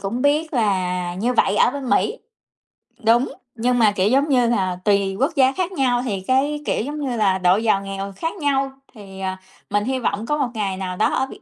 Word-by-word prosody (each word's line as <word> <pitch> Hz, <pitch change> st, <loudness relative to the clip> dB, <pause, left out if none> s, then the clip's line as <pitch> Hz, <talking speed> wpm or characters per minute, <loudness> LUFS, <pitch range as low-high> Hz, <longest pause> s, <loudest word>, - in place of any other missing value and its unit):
cũng 220 Hz, +6 st, -3 dB
biết 300 Hz, +3 st, +1 dB
là 180 Hz, -6 st, 0 dB
như 230 Hz, +7 st, 0 dB
vậy 205 Hz, -3 st, +2 dB
ở -, -, +4 dB
bên 275 Hz, -1 st, -5 dB
Mỹ, -, -, +1 dB, 0.9 s
đúng, 235 Hz, +4 st, +3 dB, 0.2 s
nhưng 245 Hz, +2 st, +1 dB
mà, 220 Hz, -3 st, +5 dB
kiểu, 200 Hz, 0 st, +1 dB
giống 275 Hz, +5 st, +2 dB
như 250 Hz, -3 st, +3 dB
là, 185 Hz, -6 st, 0 dB
tùy 200 Hz, -2 st, +2 dB
quốc 300 Hz, +5 st, 0 dB
gia 265 Hz, -1 st, +4 dB
khác 360 Hz, +6 st, -2 dB
nhau 260 Hz, -8 st, +1 dB
thì 200 Hz, -6 st, -2 dB
cái, 285 Hz, +3 st, +1 dB
kiểu, -, -, 0 dB
giống 295 Hz, +4 st, -5 dB
như 265 Hz, -4 st, -2 dB
là, 195 Hz, -3 st, +2 dB
độ 180 Hz, 0 st, +3 dB
giàu 215 Hz, -3 st, +1 dB
nghèo 195 Hz, 0 st, -5 dB
khác 325 Hz, +4 st, -3 dB
nhau, 275 Hz, -4 st, 0 dB, 0.2 s
thì, 195 Hz, -4 st, -12 dB
à, 190 Hz, 0 st, -3 dB, 0.3 s
mình 205 Hz, 0 st, +1 dB
hy 260 Hz, +3 st, -1 dB
vọng 215 Hz, -2 st, -2 dB
có 295 Hz, +4 st, 0 dB
một 275 Hz, -4 st, 0 dB
ngày 200 Hz, -4 st, -2 dB
nào 185 Hz, -1 st, -4 dB
đó 215 Hz, -, +2 dB
ở 265 Hz, -, +1 dB
Việt -, -, -12 dB
230 Hz, 225 wpm, -21 LUFS, 195-270 Hz, 0.9 s, mà